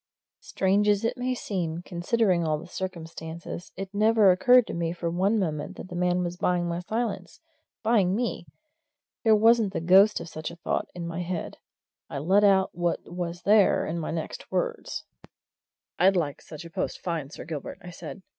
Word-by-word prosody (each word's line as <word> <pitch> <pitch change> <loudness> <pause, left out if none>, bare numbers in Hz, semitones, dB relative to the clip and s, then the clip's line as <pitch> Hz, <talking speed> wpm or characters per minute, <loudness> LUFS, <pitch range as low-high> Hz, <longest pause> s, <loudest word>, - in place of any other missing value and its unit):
Strange 200 +2 +1
as 205 +1 +2
it 230 - 0
may 255 0 -1
seem, 175 -7 -3
considering 180 0 +1
all 155 -1 +1
the - - -9
circumstances, 170 -1 -7
it 195 +1 -6
never 215 -1 +5
occurred 245 +7 +5
to - - -6
me 170 -1 -1
for 170 -1 -3
one 195 +6 +2
moment 180 -1 -2
that - - -9
the 175 - -7
man 180 0 +1
was 175 0 -4
buying 175 -1 +1
my 170 0 -2
silence, 200 -2 -3 0.4
buying 205 -5 +3
me. 230 -6 -2 0.8
There 220 -2 +6
wasn't 220 -2 +4
the - - -1
ghost 190 +5 +5
of - - -7
such 155 -1 -6
a 170 - -10
thought 170 - -2
in 175 -1 -5
my 170 +1 -4
head 175 -1 -4 0.5
I - - -5
let 190 +9 +3
out 195 -2 +4
what 175 0 -1
was 175 -1 -4
there 205 -1 +4
in 170 +2 -3
my 160 - -4
next 160 -1 -5
words. - - -2 1.0
"I'd 190 +2 +5
like 150 -6 -1
such 160 +1 -10
a 170 - -10
post - - -3
fine, 165 -6 -3
Sir - - -9
Gilbert," 155 -4 -6
I 175 - -8
said. 185 +3 -9
180 Hz, 185 wpm, -27 LUFS, 170-205 Hz, 1.0 s, There